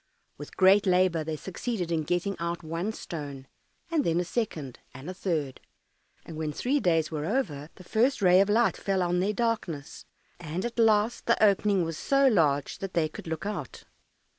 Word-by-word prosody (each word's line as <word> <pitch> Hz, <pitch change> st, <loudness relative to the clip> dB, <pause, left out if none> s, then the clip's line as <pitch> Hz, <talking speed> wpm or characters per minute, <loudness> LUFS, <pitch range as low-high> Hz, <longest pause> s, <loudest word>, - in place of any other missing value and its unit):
With 145 Hz, -, -11 dB
great 195 Hz, +2 st, +5 dB
labour 180 Hz, -3 st, +3 dB
they 155 Hz, 0 st, -3 dB
succeeded 190 Hz, +2 st, -4 dB
in 165 Hz, -1 st, +1 dB
getting 175 Hz, +5 st, -1 dB
out 170 Hz, +1 st, -3 dB
one 165 Hz, +6 st, -3 dB
stone, 145 Hz, -10 st, -7 dB, 0.5 s
and 315 Hz, -3 st, +2 dB
then 170 Hz, -4 st, +1 dB
a -, -, +1 dB
second, 165 Hz, -, -4 dB, 0.2 s
and 130 Hz, +4 st, -9 dB
a 185 Hz, -, -4 dB
third, 160 Hz, -8 st, -3 dB, 0.6 s
and 165 Hz, -, -9 dB
when 155 Hz, -1 st, -2 dB
three 260 Hz, -, 0 dB
days 165 Hz, -, +1 dB
were 150 Hz, -2 st, -3 dB
over 165 Hz, -, -2 dB
the 185 Hz, -, -13 dB
first 240 Hz, +9 st, +1 dB
ray 185 Hz, -1 st, +6 dB
of 200 Hz, -, +1 dB
light 225 Hz, +2 st, +3 dB
fell 195 Hz, -2 st, 0 dB
on 175 Hz, 0 st, 0 dB
their 200 Hz, +3 st, +1 dB
darkness, 205 Hz, -11 st, -3 dB, 0.4 s
and 170 Hz, +4 st, -4 dB
at 240 Hz, 0 st, -4 dB
last 220 Hz, 0 st, +2 dB
the 235 Hz, -, +4 dB
opening 200 Hz, -2 st, +2 dB
was 165 Hz, -1 st, -5 dB
so 275 Hz, 0 st, +3 dB
large 150 Hz, -, +2 dB
that 195 Hz, -1 st, -6 dB
they 165 Hz, -2 st, +2 dB
could 155 Hz, -, -10 dB
look 160 Hz, +3 st, -4 dB
out. 195 Hz, -10 st, -5 dB
180 Hz, 190 wpm, -28 LUFS, 160-210 Hz, 0.6 s, ray